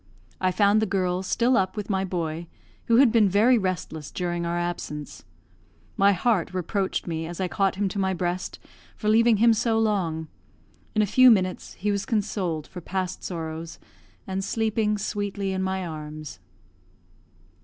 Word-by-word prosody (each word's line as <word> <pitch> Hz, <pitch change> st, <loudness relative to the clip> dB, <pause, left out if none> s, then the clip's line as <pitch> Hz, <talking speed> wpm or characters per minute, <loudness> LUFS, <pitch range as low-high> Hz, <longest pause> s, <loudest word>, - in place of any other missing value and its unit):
I 185 Hz, -, +2 dB
found 205 Hz, +2 st, +3 dB
the 220 Hz, -, +1 dB
girl 185 Hz, -1 st, 0 dB
still 235 Hz, +6 st, +2 dB
up 190 Hz, 0 st, 0 dB
with 210 Hz, -, -3 dB
my 190 Hz, -2 st, 0 dB
boy, 170 Hz, -3 st, -3 dB, 0.4 s
who 230 Hz, -, +3 dB
had 260 Hz, -3 st, +6 dB
been 220 Hz, -4 st, +4 dB
very 215 Hz, +7 st, +5 dB
restless 175 Hz, -5 st, -3 dB
during 175 Hz, -1 st, -2 dB
our 170 Hz, 0 st, -1 dB
absence. 175 Hz, -4 st, -5 dB, 0.7 s
My 200 Hz, +1 st, +5 dB
heart 190 Hz, -2 st, 0 dB
reproached 190 Hz, +2 st, -1 dB
me, 165 Hz, -1 st, -3 dB
as 175 Hz, +1 st, -7 dB
I 185 Hz, -, 0 dB
caught 195 Hz, +1 st, 0 dB
him 200 Hz, +1 st, 0 dB
to 200 Hz, -, -4 dB
my 190 Hz, -1 st, +1 dB
breast, 180 Hz, +1 st, -3 dB, 0.4 s
for 210 Hz, -, -5 dB
leaving 230 Hz, 0 st, +5 dB
him 230 Hz, +2 st, +5 dB
so 225 Hz, 0 st, +1 dB
long; 185 Hz, -8 st, 0 dB, 0.7 s
in 215 Hz, -, +4 dB
a -, -, +3 dB
few 255 Hz, +6 st, +6 dB
minutes 185 Hz, -5 st, +1 dB
he 205 Hz, +2 st, -2 dB
was 200 Hz, -1 st, -2 dB
consoled 195 Hz, -, -1 dB
for 180 Hz, -, -9 dB
past 185 Hz, +1 st, -3 dB
sorrows, 165 Hz, -1 st, -5 dB, 0.5 s
and 190 Hz, 0 st, -3 dB
sleeping 215 Hz, 0 st, 0 dB
sweetly 200 Hz, -1 st, -3 dB
in 190 Hz, 0 st, -2 dB
my 190 Hz, 0 st, -1 dB
arms. 155 Hz, -2 st, -7 dB
190 Hz, 165 wpm, -25 LUFS, 175-210 Hz, 0.7 s, had